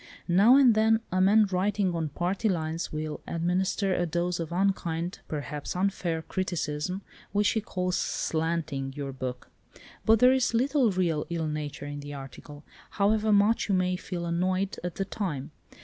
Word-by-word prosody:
Now 200 +8 +6
and 265 -4 +7
then 220 +1 +3
a 185 +1 +2
man 210 +3 +6
writing 190 0 +1
on 165 -2 -2
party 185 +8 -1
lines 165 -2 -2
will 155 0 -4
administer 185 +3 0
a 175 -1 0
dose 175 +2 -1
of 165 -1 -4
unkind, 175 -2 -1
perhaps 150 0 -5
unfair, 180 -3 -1
criticism 180 0 -3 0.3
which 205 0 +3
he 220 - 0
calls 180 -3 -2
'slating' 160 -4 -2
your 140 -2 -4
book. 130 -1 -6 0.5
But 225 +1 +5
there 250 +3 +6
is 255 -3 +1
little 260 0 +3
real 175 -5 0
ill 170 -2 -2
nature 150 -1 -4
in 145 0 -5
the 145 0 -7
article, 145 +2 -10 0.3
however 215 +1 +2
much 210 +2 +3
you 195 - +3
may 185 0 +1
feel 180 -1 -5
annoyed 185 +3 0
at 180 -2 -4
the 195 - -2
time. 165 -10 -4
180 Hz, 165 wpm, -28 LUFS, 160-200 Hz, 0.5 s, and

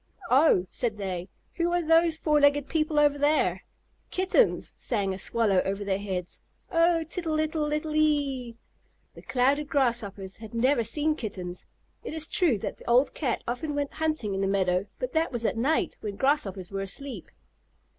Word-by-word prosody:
"Oh!" 260 - +5
said 230 -4 -2
they. 185 -2 -4 0.3
"Who 345 0 +1
are 350 - +2
those 330 0 +4
four 300 -2 +2
legged 285 0 +4
people 310 -1 0
over 290 -1 +3
there?" 295 +2 +1 0.4
"Kittens!" 380 +6 +2
sang 200 -5 -1
a - - -5
Swallow 205 -3 +1
over 195 +1 -2
their 195 -1 -1
heads. 185 -3 -5 0.3
"Oh, 335 -1 +3
tittle 320 -1 -3
ittle 310 -1 -1
ittle 305 +1 -2
ee!" 280 -6 +1 0.6
The - - -12
Clouded 275 +4 +1
Grasshoppers 215 -8 -1
had 220 +1 -10
never 250 +1 +3
seen 295 +7 0
Kittens. 185 - -6 0.4
It 395 - -6
is 320 0 -1
true 345 - +2
that - - -5
the - - -9
old 250 +4 +4
Cat 260 -6 -2
often 290 +5 -3
went 285 -1 -2
hunting 310 -10 -1
in 195 - -2
the 195 - +1
meadow, 190 -1 +1
but - - -3
that 320 0 +1
was 235 -2 -3
at - - +1
night, 270 +8 0
when 205 -2 -4
Grasshoppers 200 - 0
were 195 0 -3
asleep. 255 +8 -4
270 Hz, 175 wpm, -27 LUFS, 200-310 Hz, 0.6 s, Oh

